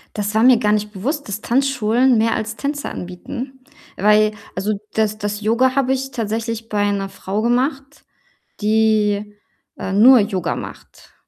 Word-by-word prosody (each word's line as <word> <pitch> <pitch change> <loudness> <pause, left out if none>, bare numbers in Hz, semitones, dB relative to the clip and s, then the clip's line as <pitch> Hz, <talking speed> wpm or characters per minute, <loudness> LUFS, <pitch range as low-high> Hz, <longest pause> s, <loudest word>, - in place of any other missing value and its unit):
Das 210 0 -2
war 220 - +4
mir 255 -1 +7
gar 210 -1 +1
nicht 210 0 0
bewusst, 260 - -4
dass 205 +1 -5
Tanzschulen 250 -1 +2
mehr 225 +1 +2
als 220 0 -4
Tänze 285 +2 -3
anbieten, 245 +9 -7 0.4
weil 210 +2 +4 0.2
also, 200 +3 -1 0.2
das 215 -1 0
das 205 0 -4
Yoga 240 +4 +2
habe 265 -1 +2
ich 270 +1 -3
tatsächlich 225 0 -3
bei 205 -1 +1
'ner 195 -1 -3
Frau 200 +3 -4
gemacht, 270 +4 -1 0.6
die, 210 -1 +1 0.4
äh, 190 - -4
nur 245 +5 +7
Yoga 200 -4 -1
macht - - -11
220 Hz, 155 wpm, -19 LUFS, 210-255 Hz, 0.6 s, mir